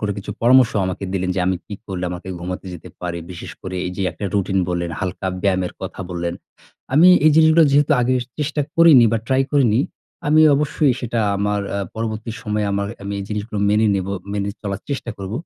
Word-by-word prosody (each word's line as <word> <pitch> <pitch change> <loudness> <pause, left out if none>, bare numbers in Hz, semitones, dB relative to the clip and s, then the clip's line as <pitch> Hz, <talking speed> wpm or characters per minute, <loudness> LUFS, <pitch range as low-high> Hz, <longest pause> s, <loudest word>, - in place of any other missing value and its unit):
করে 105 -1 -1
কিছু 100 - -7
পরামর্শ 125 0 +5
আমাকে 95 +1 -4
দিলেন, 95 -1 -1
যে - - +1
আমি 95 0 +1
কি 105 - -6
করলে 90 -2 -4
আমাকে 90 +1 -7
ঘুমাতে 90 +2 -5
যেতে 85 - -11
পারি। 85 -1 -4
বিশেষ 90 - -8
করে 95 -1 -5
এই - - -3
যে 100 - -2
একটা 105 - -8
রুটিন 95 -1 +1
বললেন, 85 -1 -2
হালকা 95 -1 -3 0.2
ব্যায়ামের 95 -2 0
কথা 95 0 -6
বললেন। 85 -1 -3 0.6
আমি 165 +5 +7 0.2
এই 155 - +7
জিনিসগুলা 160 +1 +6
যেহেতু 145 +2 +4
আগে 125 +1 +2 0.2
চেষ্টা 150 0 -1 0.2
করিনি 165 -7 +7
বা 115 - +2
ট্রাই 130 +1 +2
করিনি, 125 -5 +3 0.5
আমি 155 +1 +5 0.2
অবশ্যই 150 -1 +1
সেটা 120 -2 -2 0.2
আমার 105 0 0 0.2
আ - - -1 0.2
পরবর্তী 110 0 -4
সময়ে, 105 -2 -1
আমার 100 0 -1 0.2
আমি 100 0 -5
এই 100 - -5
জিনিসগুলো 105 0 -4
মেনে 105 +2 +3
নিবো, 95 0 -2 0.2
মেনে 100 0 -2
চলার 100 -1 -4
চেষ্টা 135 -4 -3
করব। 95 0 -6
105 Hz, 200 wpm, -20 LUFS, 95-130 Hz, 0.6 s, আমি